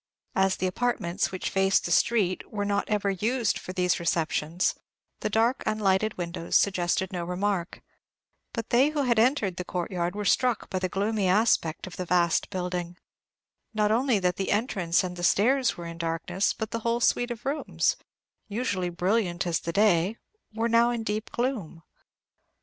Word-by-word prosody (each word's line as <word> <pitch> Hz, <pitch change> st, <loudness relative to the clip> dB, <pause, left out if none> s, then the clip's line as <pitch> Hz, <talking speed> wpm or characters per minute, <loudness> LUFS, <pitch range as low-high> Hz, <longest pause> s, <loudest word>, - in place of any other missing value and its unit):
As 190 Hz, 0 st, +2 dB
the 185 Hz, -, -1 dB
apartments 185 Hz, -2 st, -1 dB
which 185 Hz, -, -3 dB
faced 195 Hz, 0 st, +2 dB
the 175 Hz, -, -2 dB
street 185 Hz, -1 st, +1 dB
were 205 Hz, -1 st, -2 dB
not 200 Hz, 0 st, -1 dB
ever 205 Hz, -2 st, +1 dB
used 225 Hz, +4 st, 0 dB
for -, -, -7 dB
these 180 Hz, -1 st, +1 dB
receptions, 165 Hz, 0 st, 0 dB, 0.5 s
the -, -, -2 dB
dark 225 Hz, +4 st, +2 dB
unlighted 215 Hz, 0 st, +1 dB
windows 170 Hz, -1 st, -4 dB
suggested 185 Hz, 0 st, +2 dB
no 175 Hz, -1 st, -2 dB
remark; 180 Hz, 0 st, -2 dB, 0.7 s
but 230 Hz, -2 st, -5 dB
they 260 Hz, +5 st, +5 dB
who 300 Hz, -2 st, -1 dB
had 235 Hz, -3 st, +2 dB
entered 225 Hz, -7 st, +2 dB
the 180 Hz, -, -3 dB
courtyard 175 Hz, 0 st, -3 dB
were 210 Hz, 0 st, -3 dB
struck 250 Hz, +1 st, +1 dB
by 185 Hz, -, -1 dB
the 185 Hz, 0 st, -1 dB
gloomy 200 Hz, +1 st, 0 dB
aspect 185 Hz, -5 st, +2 dB
of 185 Hz, -, -10 dB
the 185 Hz, -, -3 dB
vast 170 Hz, -1 st, +2 dB
building: 180 Hz, -2 st, -4 dB, 0.8 s
not 210 Hz, -1 st, +2 dB
only 245 Hz, +1 st, +2 dB
that 180 Hz, -2 st, 0 dB
the 195 Hz, -, -2 dB
entrance 200 Hz, -6 st, +1 dB
and 180 Hz, -1 st, -5 dB
the 175 Hz, -, -6 dB
stairs 250 Hz, +8 st, +3 dB
were 170 Hz, -, -7 dB
in 170 Hz, 0 st, -8 dB
darkness, 165 Hz, +3 st, -1 dB
but 220 Hz, -2 st, -5 dB
the 230 Hz, -, -2 dB
whole 235 Hz, +1 st, 0 dB
suite 245 Hz, +1 st, +2 dB
of 235 Hz, -2 st, -7 dB
rooms, 285 Hz, +3 st, 0 dB, 0.5 s
usually 200 Hz, -5 st, -2 dB
brilliant 180 Hz, 0 st, 0 dB
as 170 Hz, -2 st, 0 dB
the 170 Hz, -, -4 dB
day, 200 Hz, +1 st, +3 dB, 0.3 s
were 225 Hz, +2 st, -1 dB
now 235 Hz, +1 st, +4 dB
in 235 Hz, -2 st, -2 dB
deep 215 Hz, +1 st, -3 dB
gloom. 230 Hz, -, -3 dB
195 Hz, 170 wpm, -27 LUFS, 180-225 Hz, 0.8 s, they